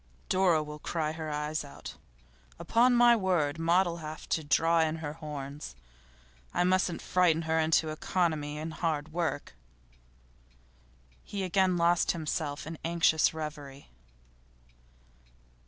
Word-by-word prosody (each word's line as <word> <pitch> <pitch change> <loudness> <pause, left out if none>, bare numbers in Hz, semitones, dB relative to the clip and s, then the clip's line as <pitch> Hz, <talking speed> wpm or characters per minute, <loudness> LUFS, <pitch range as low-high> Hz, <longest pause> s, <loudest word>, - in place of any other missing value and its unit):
'Dora 180 -4 +3
will 150 0 -9
cry 155 -1 -2
her 160 0 -6
eyes 150 +1 -2
out. 140 - -10 0.6
Upon 245 +2 +3
my 240 0 +6
word, 170 -7 0
Maud'll 170 +1 +2
have 155 -1 -8
to 160 - 0
draw 165 +3 +3
in 160 -1 +1
her 155 -2 -5
horns. 145 - -7 0.8
I - - +3
must 185 -1 +1
frighten 170 -3 +2
her 160 0 +1
into 160 0 +2
economy 155 -2 -1
and 160 +1 -5
hard 155 -2 -2
work.' 165 - -2 1.7
He 200 -1 -5
again 185 0 +2
lost 170 0 +3
himself 155 -2 -3
in 160 0 -7
anxious 165 -1 +3
reverie. 145 -3 -8
160 Hz, 125 wpm, -29 LUFS, 150-175 Hz, 1.7 s, my